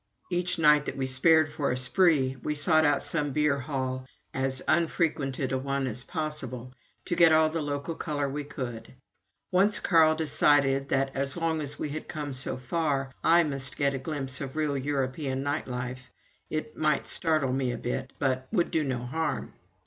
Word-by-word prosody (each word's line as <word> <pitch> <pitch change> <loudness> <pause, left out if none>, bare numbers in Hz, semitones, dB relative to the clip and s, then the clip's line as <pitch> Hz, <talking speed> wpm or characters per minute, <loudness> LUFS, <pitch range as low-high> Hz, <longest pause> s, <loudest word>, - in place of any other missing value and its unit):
Each 175 +1 0
night 150 -2 +4
that - - -4
we 135 - -1
spared 155 +5 +5
for 145 -2 -2
a 125 - -1
spree 130 +1 +3
we 150 - -2
sought 155 +1 +4
out 145 -1 +2
some 150 -3 0
beer 150 -1 +1
hall 130 -2 -4 0.3
as 130 0 0
unfrequented 155 -5 0
a 130 - 0
one 135 0 -2
as 125 -1 -4
possible, 130 -7 -5 0.3
to 175 - -1
get 170 -1 +6
all 155 0 +4
the 165 0 -2
local 145 +2 -3
color 145 -3 -3
we 145 +2 -4
could. 125 -5 -7 0.6
Once 195 +3 +3
Carl 160 -3 +4
decided 145 -3 +2
that, 135 0 0
as 140 +3 0
long 165 -2 -1
as 145 0 -1
we 150 - -3
had 155 +2 -6
come 150 -3 -5
so 130 0 +1
far, 135 0 -2
I 170 +1 +5
must 135 -3 -2
get 140 -1 +1
a 135 - -3
glimpse 135 -2 -2
of 135 0 -6
real 155 -2 0
European 135 0 -2
night 145 +1 -2
life 125 0 -6 0.4
it 155 -1 -4
might 155 -2 +1
startle 155 -6 +1
me 130 -2 0
a - - -4
bit, 130 +2 -4
but 130 -1 -1
would 175 - 0
do 160 - +1
no 125 -3 -3
harm. 160 +6 -3
140 Hz, 185 wpm, -27 LUFS, 130-155 Hz, 0.6 s, get